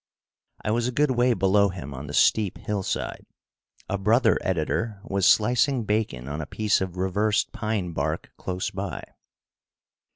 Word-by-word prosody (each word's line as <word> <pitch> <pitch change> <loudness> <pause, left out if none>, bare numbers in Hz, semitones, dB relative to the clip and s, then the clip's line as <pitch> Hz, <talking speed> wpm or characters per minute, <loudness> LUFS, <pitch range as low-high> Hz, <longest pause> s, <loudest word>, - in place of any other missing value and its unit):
I 105 - +1
was 120 +2 +1
a - - -1
good 145 +2 +2
way 120 -1 +3
below 100 +1 +3
him 80 -7 -7
on 70 +2 -7
the 70 - -7
steep 105 -4 +3
hillside. 100 -3 -3 0.6
A 100 - -2
brother 110 +1 +4
editor 95 +5 -1
was 100 -3 +1
slicing 125 +3 +3
bacon 105 - -1
on 75 +2 -4
a 75 - -6
piece 105 +3 +1
of 95 -1 -4
reversed 105 +3 +1
pine 105 -5 -2
bark 80 0 -3
close 95 0 -3
by. - - -5
100 Hz, 155 wpm, -25 LUFS, 90-110 Hz, 0.6 s, brother